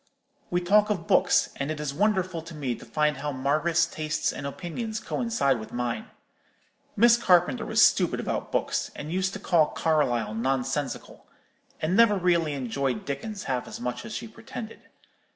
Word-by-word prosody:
We 175 0 0
talk 210 +4 +4
of 180 -6 -1
books; - - +3
and 140 +1 -2
it 155 -1 -3
is 150 -2 -3
wonderful 185 -1 0
to 165 0 -10
me 135 -5 -2
to - - -10
find 150 -2 +1
how 145 +1 -3
Margaret's 155 +5 +1
tastes 155 -2 -2
and 140 - -5
opinions 215 - -5
coincide 225 - 0
with 110 - -9
mine. 120 -1 -3 0.9
Miss 235 +2 +6
Carpenter 180 - +3
was - - +4
stupid - - +3
about - - -3
books, - - -1
and 150 +2 -6
used 185 0 0
to 210 - -5
call 170 -6 +3
Carlyle 130 -9 0
nonsensical; 135 +3 -2 0.5
and 160 +4 0
never 220 -2 +5
really 170 -4 +2
enjoyed 130 -1 -2
Dickens 195 +10 -5
half 125 -2 -2
as - - -7
much 125 0 -4
as - - -8
she - - -5
pretended. 225 0 -9
155 Hz, 170 wpm, -26 LUFS, 135-190 Hz, 0.9 s, Miss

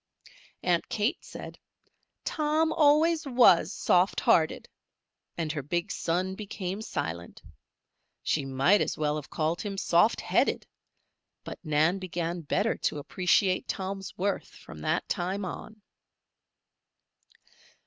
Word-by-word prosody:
Aunt 175 -2 +1
Kate 215 +3 -1
said: - - -9 0.7
"Tom 310 +1 +1
always 310 +1 +3
was 240 -9 +5
soft 180 -1 +2
hearted," 160 -1 +2 0.7
and 160 -3 -1
her 155 -2 -3
big 170 +5 -2
son 180 +3 -1
became 195 -1 -5
silent. 85 - -5 0.8
She 150 - 0
might 135 +9 +3
as - - -1
well 150 -1 0
have 150 - -8
called 160 +2 -1
him 200 -2 -5
"soft 175 +4 +3
headed"; - - +1 0.8
but - - -8
Nan 160 +4 +2
began 175 -2 -3
better 200 +8 0
to - - -1
appreciate 185 +5 +1
Tom's 195 0 -5
worth 195 +2 -1
from - - -13
that - - -1
time 190 +1 -2
on. 215 +3 -8
185 Hz, 120 wpm, -28 LUFS, 165-205 Hz, 0.8 s, was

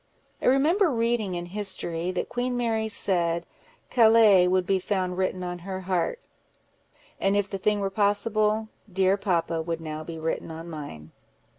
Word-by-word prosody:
I - - 0
remember 320 +9 +4
reading 230 -6 0
in 175 0 -4
history, 175 -3 -2
that 185 - -2
Queen 245 0 -2
Mary 225 -2 0
said, 170 -5 +1 0.5
'Calais 220 -6 +6
would 185 0 +2
be 195 0 +1
found 185 -1 -2
written 185 0 -1
on 175 0 -5
her 190 +1 -6
heart;' 185 - -1 1.0
and 195 +1 +2
if 205 -1 +1
the 195 - -5
thing 210 +2 +1
were 195 0 -1
possible, 215 +2 +1 0.2
'dear 190 +1 +3
papa' 170 -4 -1
would 165 0 -3
now 155 -1 -6
be 165 +1 -7
written 160 +1 -3
on 165 +1 -8
mine." 145 - -8
190 Hz, 160 wpm, -26 LUFS, 175-215 Hz, 1.0 s, Calais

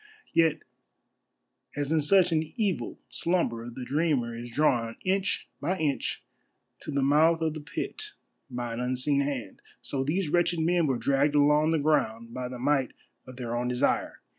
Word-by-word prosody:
Yet 165 -2 +3 1.1
as 145 0 -2
in 160 -1 +3
such 180 +4 +4
an 160 -1 +3
evil 210 -7 -1
slumber 120 -10 -1
the 125 +1 -7
dreamer 140 -6 0
is 120 +1 -7
drawn 120 -4 +1
inch 190 +1 0
by 185 +2 0
inch 150 -5 -1 0.6
to - - -10
the 140 -2 0
mouth 155 +4 +4
of 160 -1 0
the 155 - -6
pit 420 - -5 0.4
by 120 -2 -4
an 115 - -4
unseen 130 +3 +1
hand, 135 -8 -4 0.2
so 135 -1 -2
these 160 +4 -1
wretched 175 +1 +2
men 170 0 +2
were 130 -3 +1
dragged 140 +3 +1
along 150 +2 +4
the 165 - +2
ground 115 -7 0
by 125 0 -4
the 125 0 -7
might 135 0 +1 0.3
of 130 - -10
their 120 -2 -4
own 120 +1 -1
desire. 125 0 0
145 Hz, 165 wpm, -28 LUFS, 125-160 Hz, 1.1 s, such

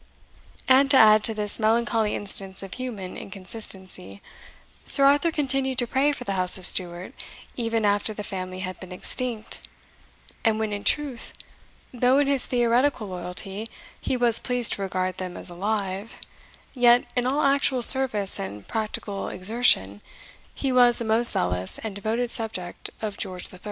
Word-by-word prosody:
And 270 +1 +4
to 275 - +5
add 215 -2 +6
to 225 - +2
this 210 0 +3
melancholy 225 -1 0
instance 195 -1 -4
of 195 - -8
human 225 -8 -7
inconsistency, 190 - -7 0.7
Sir 275 -1 +5
Arthur 290 +4 +3
continued 270 -4 0
to 245 - +2
pray 270 +4 +1
for 280 - -7
the 200 - -4
House 185 -1 +4
of 185 - 0
Stuart 175 -1 +3 0.4
even 230 -2 -1
after 205 +1 0
the 210 -1 -7
family 185 -2 -6
had 185 -1 -6
been 185 -1 -11
extinct, 225 +4 -2 0.8
and 225 -2 +1
when, 220 -1 -3
in 205 0 -5
truth, 285 -5 -1 0.6
though 250 +2 +2
in 285 - +3
his 275 -2 +1
theoretical 240 -1 0
loyalty 185 +4 -7 0.3
he 260 - -2
was 240 -2 +3
pleased 245 -2 +1
to - - -6
regard 185 -1 -3
them 180 -1 -6
as - - -7
alive, 200 +2 -4 0.6
yet, 245 -1 +4
in 245 0 0
all 280 +4 0
actual 275 -2 +2
service 230 -7 +5
and 100 +1 -8
practical 210 -2 -4
exertion, 185 - +1 0.5
he 270 - -2
was 245 -1 +4
a 235 - -4
most 225 +2 +6
zealous 90 +1 -1
and 220 -2 -6
devoted 225 +4 -2
subject 220 -7 -1
of 210 -2 -4
George 185 -2 -5
III. 180 - -12
220 Hz, 160 wpm, -24 LUFS, 190-245 Hz, 0.8 s, add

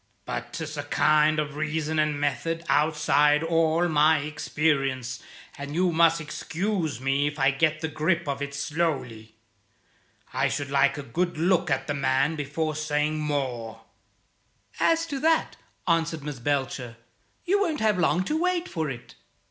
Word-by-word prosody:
But - - -5
'tis 155 -2 -5
a 145 - -3
kind 155 +1 +3
of 150 -1 -2
reason 155 +1 -1
and 150 -1 +1
method 155 +4 -1
outside 150 -1 +3
all 165 +1 +2
my 155 0 +4
experience, 135 -4 -1 0.4
and 145 +1 -6
you 180 +1 +2
must 165 0 +4
excuse 165 - -3
me 135 +2 +1
if 145 +1 -5
I 135 -1 +3
get 155 +3 +1
the 160 - -1
grip 160 +2 0
of 140 0 -2
it 140 0 -4
slowly. 135 -8 -2 1.0
I - - +2
should 140 0 -3
like 140 +1 +3
a 145 - -5
good 175 +3 -2
look 175 +1 +2
at 135 -1 0
the 145 - -2
man 140 +2 +1
before 155 +2 -2
saying 155 0 -1
more." 125 -7 -3 1.0
"As 330 0 +3
to 285 -4 -4
that," 320 +2 +2 0.3
answered 165 -2 +1
Miss 145 -3 -6
Belcher, 130 -3 -2 0.5
"you 400 +3 +2
won't 325 -7 0
have 215 -4 +2
long 175 +1 +2
to 310 - -1
wait 360 0 0
for 160 -3 -3
it. 120 -3 -8
155 Hz, 155 wpm, -26 LUFS, 140-165 Hz, 1.0 s, my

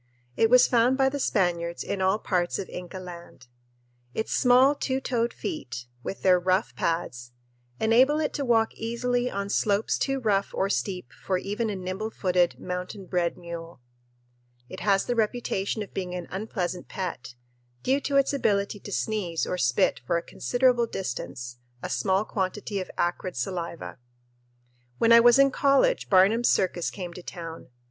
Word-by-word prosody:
It 225 - +3
was 250 +1 +7
found 245 +2 +3
by 270 -1 +4
the 285 +1 -4
Spaniards 170 -7 0
in 200 - -3
all 190 +2 +3
parts 180 -5 -1
of 195 - -5
Inca 180 +1 -7
Land. 175 -7 -10 0.7
Its 220 - -2
small 255 +3 +5
two 265 -2 -2
toed 240 -3 -1
feet, 305 - -6 0.2
with 195 - -6
their 185 -1 +5
rough 185 +4 0
pads, 125 -8 -2 0.5
enable 255 +7 +4
it 305 - -1
to 285 - -2
walk 225 -3 +2
easily 245 +2 -1
on 200 -2 -3
slopes 205 +1 +1
too 270 -1 0
rough 200 -5 0
or 195 +1 0
steep 180 - -3
for 185 - -2
even 210 +4 -2
a 205 - -2
nimble 185 +3 -4
footed, 180 -4 +1
mountain 180 +2 -5
bred 175 -2 -1
mule. 170 -2 -8 0.9
It - - -8
has 195 0 +2
the 245 - 0
reputation 215 -2 -1
of 200 - -13
being 180 -2 -4
an 175 -1 -5
unpleasant 185 -3 -3
pet, 170 -10 -5 0.5
due 270 +2 +2
to 280 0 0
its 275 +1 +3
ability 205 -6 0
to 205 - -9
sneeze 190 -5 -1
or 180 - -3
spit 125 -2 +2
for 170 - +2
a 170 - -3
considerable 245 -1 +1
distance 120 - -5 0.3
a - - -4
small 195 +1 +1
quantity 200 +1 -3
of 185 - -7
acrid 175 -1 -2
saliva. 170 +3 -4 1.0
When 230 - +3
I 230 - +10
was 240 +1 +6
in 275 0 +5
college 280 - +2
Barnum's 205 +5 +5
Circus 180 -2 +1
came 180 -3 -7
to 180 - -9
town. 165 -2 -8
195 Hz, 165 wpm, -26 LUFS, 180-235 Hz, 1.0 s, I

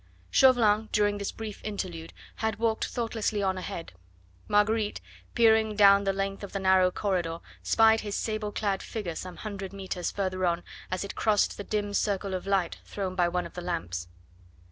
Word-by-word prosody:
Chauvelin 225 -5 +5
during 205 -1 +2
this 200 - -2
brief 220 -2 -7
interlude, 180 -6 -5 0.3
had 220 -1 -1
walked 225 0 +1
thoughtlessly 225 -3 -1
on 190 -1 +1
ahead. 170 - -6 0.5
Marguerite, 210 +1 +2 0.4
peering 220 -2 +4
down 200 -1 +6
the 195 - +3
length 195 +1 -3
of 200 - -7
the 195 - -1
narrow 190 -1 +4
corridor, 180 -4 -1 0.2
spied 225 0 +4
his 205 -1 -4
sable 215 -1 -2
clad 200 -2 -1
figure 205 -7 -4
some 180 +2 -7
hundred 200 -3 -6
metres 190 -2 -3
further 185 -2 -2
on 175 -1 +1 0.3
as 185 +1 -2
it 200 - -6
crossed 215 -2 +2
the 205 - -6
dim 205 0 -2
circle 200 -1 0
of 185 +1 -4
light 195 -4 0
thrown 190 -2 -4
by 180 -2 +2
one 180 +1 -1
of - - -9
the 180 - -6
lamps. 125 - -3
200 Hz, 175 wpm, -28 LUFS, 185-215 Hz, 0.5 s, down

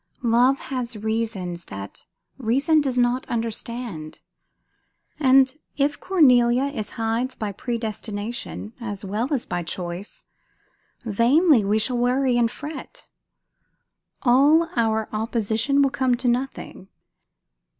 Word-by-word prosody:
Love 245 +3 +4
has 255 -4 -5
reasons 210 -6 -3
that 100 0 -8 0.3
reason 275 +6 +2
does 265 -3 -1
not 245 +1 +2
understand; 230 -7 -5 1.0
and 265 0 +4 0.2
if 285 0 +1
Cornelia 250 -8 +4
is 275 -7 -3
Hyde's 230 +3 -1
by 210 -2 -3
predestination, 220 0 -5
as 205 -3 -5
well 215 +8 -2
as 270 -5 -1
by 175 - -3
choice, 175 +3 -6 0.8
vainly 240 - +4
we 205 +2 +2
shall 240 +3 0
worry 250 +1 +2
and 235 -1 +3
fret; 295 +5 -9 1.1
all 285 +7 +5
our 220 -2 +1
opposition 225 +5 +1
will 275 - +2
come 260 -2 +1
to 250 +1 -3
nothing. 245 -5 -2
240 Hz, 110 wpm, -23 LUFS, 220-265 Hz, 1.1 s, all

